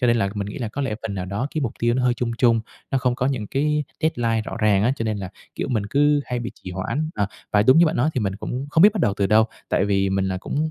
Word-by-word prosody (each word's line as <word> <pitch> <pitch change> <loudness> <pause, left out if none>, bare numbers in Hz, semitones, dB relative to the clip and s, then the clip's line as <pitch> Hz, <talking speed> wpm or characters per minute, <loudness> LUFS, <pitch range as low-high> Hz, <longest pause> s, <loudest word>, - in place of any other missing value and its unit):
Cho 125 - +3
nên 120 - +4
là 100 -4 +1
mình 100 -1 -3
nghĩ 105 - -6
là 115 -4 -3
có 140 +6 -4
lẽ 130 -5 -1
phần 110 -3 -4
nào 90 -1 -3
đó 100 +8 -2
cái 155 - 0
mục 115 - -1
tiêu 120 0 +2
nó 130 - 0
hơi 125 -1 +3
chung 120 -2 -2
chung, 115 -3 +4 0.3
nó 135 - +2
không 125 -1 +1
có 125 - -1
những 125 -7 -1
cái 150 +3 0 0.2
deadline 115 -8 +1
rõ - - -6
ràng 105 -2 +3
á, 125 +4 +3
cho 115 - -3
nên 110 -2 -1
là, 95 -2 -5 0.3
kiểu, - - -3
mình 105 -4 0
cứ 145 +1 +3
hay 125 - -3
bị 120 0 -4
trì 90 - -9
hoãn, 115 - -2
ờ. 100 -2 0 0.3
Và 105 0 +5
đúng 130 +8 +6
như 170 - +6
bạn 155 - 0
nói 150 +6 +2
thì 125 - 0
mình 100 -1 -2
cũng 125 +5 -4
không 160 +2 +4
biết 205 0 +8
bắt 215 - -2
đầu 100 -10 +2
từ 100 - +2
đâu, 110 +2 +5 0.2
tại 95 - +2
vì 100 -1 +1
mình 95 0 +1
là 95 - -2
cũng 155 +10 -2
120 Hz, 320 wpm, -23 LUFS, 100-135 Hz, 0.3 s, biết